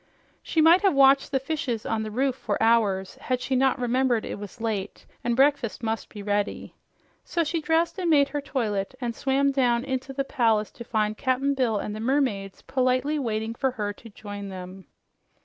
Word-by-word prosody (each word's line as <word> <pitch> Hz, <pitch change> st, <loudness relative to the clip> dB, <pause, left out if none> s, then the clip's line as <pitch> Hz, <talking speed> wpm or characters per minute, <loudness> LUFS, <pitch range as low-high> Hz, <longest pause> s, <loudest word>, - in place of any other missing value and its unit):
She 320 Hz, -, +1 dB
might 335 Hz, +4 st, +6 dB
have 390 Hz, -7 st, +3 dB
watched 275 Hz, +1 st, +5 dB
the 270 Hz, -, +2 dB
fishes 270 Hz, -5 st, -3 dB
on 225 Hz, -1 st, -1 dB
the 215 Hz, -, -4 dB
roof 260 Hz, +4 st, 0 dB
for 215 Hz, -5 st, -2 dB
hours, 215 Hz, -4 st, +2 dB
had 255 Hz, -1 st, -2 dB
she 260 Hz, +1 st, -1 dB
not 265 Hz, +1 st, +3 dB
remembered 245 Hz, -1 st, +1 dB
it -, -, -5 dB
was 205 Hz, +3 st, -9 dB
late 220 Hz, -4 st, -3 dB, 0.2 s
and 240 Hz, -1 st, 0 dB
breakfast 270 Hz, -4 st, +2 dB
must 225 Hz, 0 st, -2 dB
be 205 Hz, -2 st, -8 dB
ready. 205 Hz, 0 st, -2 dB, 0.5 s
So 340 Hz, -, 0 dB
she 325 Hz, +1 st, -2 dB
dressed 330 Hz, +4 st, +1 dB
and 355 Hz, -2 st, 0 dB
made 285 Hz, -3 st, +4 dB
her 290 Hz, +1 st, -3 dB
toilet, 225 Hz, -6 st, -2 dB
and 240 Hz, -2 st, -3 dB
swam 275 Hz, +2 st, +1 dB
down 245 Hz, -3 st, +2 dB
into 265 Hz, 0 st, -3 dB
the 275 Hz, +1 st, -1 dB
palace 225 Hz, -5 st, +1 dB
to 235 Hz, -, -10 dB
find 215 Hz, -2 st, 0 dB
Cap'n 270 Hz, +1 st, +1 dB
Bill 250 Hz, -5 st, +1 dB
and 210 Hz, +1 st, -4 dB
the -, -, -6 dB
mermaids 225 Hz, -6 st, -1 dB
politely 255 Hz, +3 st, +1 dB
waiting 225 Hz, -3 st, -2 dB
for 265 Hz, +3 st, 0 dB
her 210 Hz, -5 st, -3 dB
to 225 Hz, +3 st, -14 dB
join 205 Hz, -1 st, -8 dB
them. 185 Hz, 0 st, -9 dB
245 Hz, 195 wpm, -26 LUFS, 215-275 Hz, 0.5 s, might